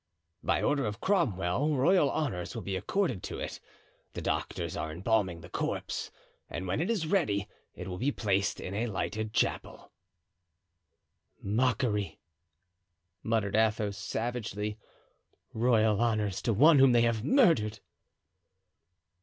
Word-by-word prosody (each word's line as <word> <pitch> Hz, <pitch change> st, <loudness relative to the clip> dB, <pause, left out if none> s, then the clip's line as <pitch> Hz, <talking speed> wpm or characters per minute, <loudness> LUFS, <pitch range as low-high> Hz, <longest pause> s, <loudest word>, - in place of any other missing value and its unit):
"By -, -, 0 dB
order 145 Hz, -2 st, +2 dB
of 105 Hz, +2 st, -5 dB
Cromwell 145 Hz, -, +1 dB
royal 150 Hz, +2 st, +4 dB
honors 120 Hz, -, -2 dB
will 115 Hz, -, -5 dB
be 95 Hz, 0 st, -3 dB
accorded 130 Hz, -, -1 dB
to -, -, -6 dB
it. -, -, -5 dB, 0.5 s
The -, -, -5 dB
doctors -, -, -2 dB
are 80 Hz, -, -3 dB
embalming 95 Hz, 0 st, 0 dB
the 90 Hz, -, -12 dB
corpse, -, -, -3 dB, 0.4 s
and 95 Hz, -, -5 dB
when 95 Hz, -, -1 dB
it 175 Hz, -, -1 dB
is 210 Hz, -8 st, 0 dB
ready 110 Hz, -, +1 dB, 0.3 s
it -, -, -7 dB
will 90 Hz, -1 st, -5 dB
be 140 Hz, +6 st, +1 dB
placed 100 Hz, -6 st, 0 dB
in 95 Hz, -, -6 dB
a 110 Hz, +4 st, -1 dB
lighted 110 Hz, +1 st, -3 dB
chapel." 110 Hz, -, -2 dB, 1.5 s
"Mockery," 110 Hz, -1 st, 0 dB, 1.0 s
muttered 110 Hz, -3 st, 0 dB
Athos, 110 Hz, -2 st, +1 dB
savagely; 105 Hz, -1 st, -3 dB, 0.7 s
"royal 110 Hz, -2 st, +3 dB
honors 110 Hz, -5 st, 0 dB
to 115 Hz, -, 0 dB
one 145 Hz, +8 st, +6 dB
whom 135 Hz, -2 st, +6 dB
they 120 Hz, -, +5 dB
have 115 Hz, -2 st, +1 dB
murdered!" 140 Hz, -, +3 dB
110 Hz, 130 wpm, -30 LUFS, 100-130 Hz, 1.5 s, one